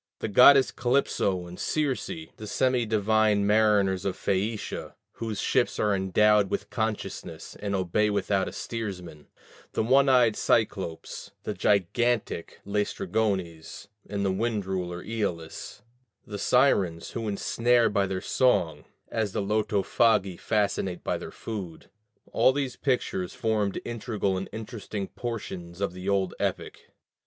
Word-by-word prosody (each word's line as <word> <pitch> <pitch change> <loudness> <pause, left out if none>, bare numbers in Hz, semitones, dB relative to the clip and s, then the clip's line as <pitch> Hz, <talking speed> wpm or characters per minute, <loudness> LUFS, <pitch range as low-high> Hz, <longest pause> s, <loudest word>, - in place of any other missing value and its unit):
The - - -3
goddesses 130 +5 +7
Calypso 120 -7 0
and 85 +1 -10
Circe; 140 -7 -1 0.3
the 110 - -8
semi 125 +1 +1
divine 110 -1 +2
mariners 105 -3 +3
of 95 -1 -2
Phæacia, 105 +3 -2 0.2
whose 110 -3 -5
ships 130 -2 +1
are 105 -1 +2
endowed 100 +1 +3
with - - -3
consciousness 110 -1 -4
and 100 -1 -2
obey 95 +3 +1
without 100 -1 0
a - - -4
steersman; 90 -9 -6 0.5
the - - +1
one 135 +4 +4
eyed 120 -4 +5
Cyclopes, 95 -7 -1
the - - -3
gigantic 105 0 0
Læstrygones, 100 -3 -2 0.2
and 100 -1 -2
the 95 - +2
wind 105 0 -1
ruler 90 -2 -3
Æolus; 100 -3 -4 0.4
the 105 -1 -6
Sirens, 100 -11 +2
who 115 -2 -4
ensnare 115 +3 +2
by 100 -2 +1
their 95 -1 -3
song, 85 - +1 0.2
as 105 -3 -1
the - - -1
Lotophagi 105 -1 +2
fascinate 100 -3 -1
by - - -1
their - - -7
food, 100 -8 -7 0.4
all - - +4
these 135 -2 -2
pictures 125 -9 -1
formed 105 -3 0
integral 110 -4 -2
and 95 +1 -4
interesting 105 -2 -6
portions 95 -7 -6
of 100 -3 -1
the 90 +2 -5
old 95 -2 +1
epic. - - -3
105 Hz, 130 wpm, -27 LUFS, 95-115 Hz, 0.5 s, goddesses